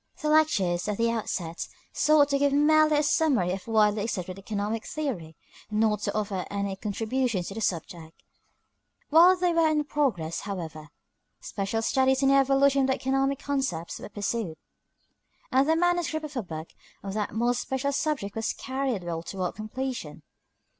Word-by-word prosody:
The 305 -3 -1
lectures, 200 - +2
at 210 -1 -1
the 230 0 +2
outset, 175 -7 -3 0.3
sought 300 -2 +4
to 280 -1 +1
give 285 0 +2
merely 305 +1 +4
a 295 - +2
summary 280 - +2
of 190 +3 -5
widely 215 -2 +3
accepted 185 -3 -4
economic 210 +2 -3
theory, 205 - -4 0.3
not 215 -1 +1
to - - -3
offer 200 -3 -2
any 200 -1 -2
contribution 220 +1 -1
to 185 - -6
the 225 - -5
subject. 165 -3 -4 0.9
While 345 +4 +7
they 355 -1 +1
were 330 -1 +4
in 300 -1 +1
progress, 240 - -1
however, 165 -6 -6 0.5
special 205 +3 -3
studies 265 +2 +2
in 270 - +5
the 275 - +5
evolution 275 0 +4
of 265 - +2
the 265 - +2
economic 270 +1 0
concepts 265 - -3
were - - -8
pursued, 205 -4 -3 0.9
and 270 +3 +3
the 320 - +4
manuscript 340 -2 +1
of 295 -1 -9
a 245 - 0
book 160 -4 -7 0.3
on 195 - -4
that 210 0 -3
more 240 +2 +2
special 265 +3 -2
subject 275 -8 -2
was 225 0 -1
carried 260 -7 -3
well 170 -1 -3
toward 185 +1 -4
completion. 255 +4 -5
230 Hz, 165 wpm, -27 LUFS, 195-280 Hz, 0.9 s, While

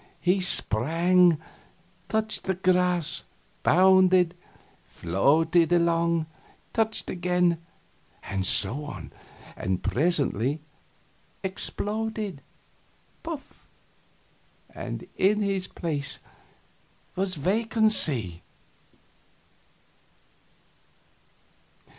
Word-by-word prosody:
He 180 +2 +2
sprang 170 - +3 0.7
touched 220 0 -1
the 190 - -1
grass 180 -2 +1 0.4
bounded 185 0 +4 0.5
floated 160 - +1
along 170 -1 +2 0.5
touched 220 -1 -1
again 180 -1 +1 0.6
and 95 -1 -3
so 110 +9 +4
on, 145 - -9 0.4
and 95 -1 -3
presently 140 - +1 0.8
exploded 210 -1 -3 0.8
puff! 325 -4 -9 1.1
and - - -6
in 210 +2 +2
his 195 -2 -2
place 145 -5 -3 1.0
was 185 0 -1
vacancy. 180 - +2
180 Hz, 65 wpm, -26 LUFS, 150-190 Hz, 1.1 s, bounded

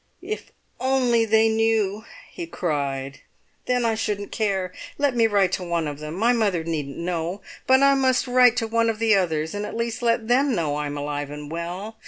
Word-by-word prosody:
"If 425 +4 -6 0.3
only 250 -3 +2
they 220 0 +4
knew!" 220 -2 +1 0.3
he 345 -2 -6
cried; 140 - -3 0.5
"then 250 -1 +1
I 225 - +2
shouldn't 210 -2 -3
care. 195 -4 -1 0.2
Let 285 -3 +1
me 230 -1 +4
write 200 -4 +2
to 185 - -2
one 170 -2 -1
of 145 -1 -6
them! 155 +1 -6
My 230 +6 +3
mother 200 -8 +1
needn't 150 -4 -4
know; 170 +2 -3 0.3
but 265 +1 +5
I 275 0 +6
must 260 -2 +2
write 250 -1 +5
to 225 -2 0
one 230 0 +1
of 225 - -1
the 225 0 +3
others, 160 -5 0
and 205 0 -3
at 210 - -5
least 230 0 -2
let 230 -1 +1
them 260 +1 +3
know 155 -5 -1
I 150 0 -2
am 145 0 -5
alive 145 0 -3
and 150 0 -8
well. 180 +6 -5
210 Hz, 205 wpm, -24 LUFS, 165-235 Hz, 0.5 s, I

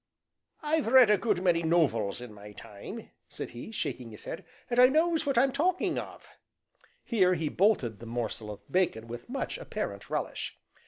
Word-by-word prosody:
"I've 305 -3 +1
read 250 -2 +7
a 210 - +5
good 205 -6 0
many 175 -2 +3
nov 165 -4 +3
els 105 0 -3
in 125 -3 -9
my 105 0 -11
time," 100 0 -9 0.2
said - - -6
he, 120 - -8
shaking 125 - -4
his 105 - -12
head, 165 - -6 0.2
"and 240 0 0
I 250 - +10
knows 320 +2 +2
what 275 -3 +1
I'm 265 +3 +5
talking 345 +7 +1
of;" - - -9 0.8
here 185 -6 +3
he 160 -2 -1
bolted 160 - +2
the 115 - -9
morsel 115 -2 -4
of 105 -1 -7
bacon 175 -11 +1
with 120 - -8
much 275 - -3
apparent - - -5
relish. - - -3
180 Hz, 180 wpm, -29 LUFS, -, 0.8 s, I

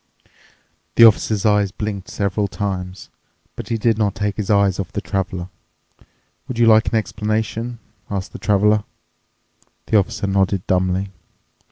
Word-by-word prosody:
The 115 - +7
Officer's 110 -1 +3
eyes 105 -2 +3
blinked 100 -1 -5
several 100 +1 -1
times, 95 -2 -5 0.5
but - - -8
he 115 - 0
did 115 0 +1
not 105 -2 +1
take 105 -1 -2
his 105 -3 -4
eyes 100 -2 +3
off 95 - -4
the - - -3
Traveler. 95 -3 -3 1.0
"Would 130 -4 -5
you 120 - +4
like 110 0 +5
an - - 0
explanation," 110 +2 -2 0.3
asked 95 -2 -4
the - - -8
Traveler. 105 +1 +2 1.0
The 110 - +2
Officer 100 +1 -2
nodded 95 -1 0
dumbly. 95 +1 0
100 Hz, 145 wpm, -20 LUFS, 95-110 Hz, 1.0 s, The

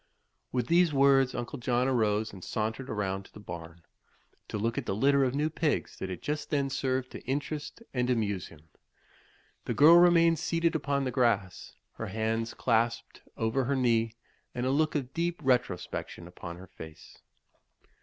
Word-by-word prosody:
With 125 -2 0
these 170 +4 +4
words 135 -2 +4
Uncle 120 +3 -5
John 125 +1 +1
arose 110 -4 +1
and 95 -3 -10
sauntered 110 +4 -3
around 95 -2 -2
to - - -18
the - - -11
barn, 85 -3 -9 0.6
to - - -4
look 115 +3 -1
at - - -8
the 95 - 0
litter 140 +5 +3
of 130 0 0
new 150 +2 +1
pigs 160 -1 -1
that 95 -2 -4
just 150 +1 -3
then 140 -2 0
served 130 -1 -1
to - - -8
interest 145 - -4
and 125 -1 0
amuse 105 -7 0
him. 75 -2 -16 1.0
The - - -2
girl 160 +4 +8
remained 170 -2 +5
seated 165 0 +1
upon 140 -3 0
the 130 - -1
grass, 115 -7 0 0.2
her 115 - -4
hands 110 +3 -2
clasped 115 -1 0 0.2
over 115 +4 0
her 140 +3 0
knee 115 -3 +1 0.4
and 125 - -2
a 130 - +1
look 155 +3 +1
of 135 -3 -2
deep 170 +1 -1
retrospection 120 -8 -1
upon 85 -1 -8
her 95 - -11
face. 80 -4 -12
125 Hz, 170 wpm, -29 LUFS, 105-140 Hz, 1.0 s, girl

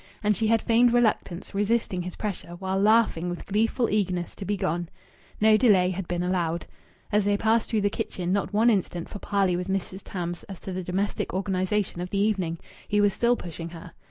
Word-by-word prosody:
And 210 0 +3
she 220 +4 0
had 225 0 +3
feigned 235 +1 +4
reluctance, 215 -7 0
resisting 205 -2 0
his 180 0 -6
pressure, 190 -4 -5
while 190 +1 -2
laughing 210 -5 +3
with 175 - -5
gleeful 225 +4 +1
eagerness 185 -4 -1
to 195 - -8
be 205 +2 -1
gone. 175 -2 -2 0.5
No 215 0 +6
delay 195 -7 +4
had 185 -1 -4
been 175 0 -1
allowed. 175 -2 -1 0.5
As 210 0 +3
they 205 0 +2
passed 220 +2 +2
through 220 -2 +1
the 205 - +2
kitchen, 180 -1 -2
not 200 - 0
one 220 +3 +4
instant 180 -4 -1
for 205 - -7
parley 195 -3 +1
with 180 +1 -3
Mrs. 190 0 -3
Tams 175 -2 -4
as 195 -3 -9
to 190 - -6
the 185 0 -3
domestic 185 +2 -2
organization 190 -1 -1
of 180 - -4
the 200 - -2
evening! 195 -5 +1 0.3
He 205 - +1
was 205 -1 +4
still 240 +3 +2
pushing 170 -4 -7
her.... 165 0 -10
195 Hz, 205 wpm, -26 LUFS, 180-210 Hz, 0.5 s, No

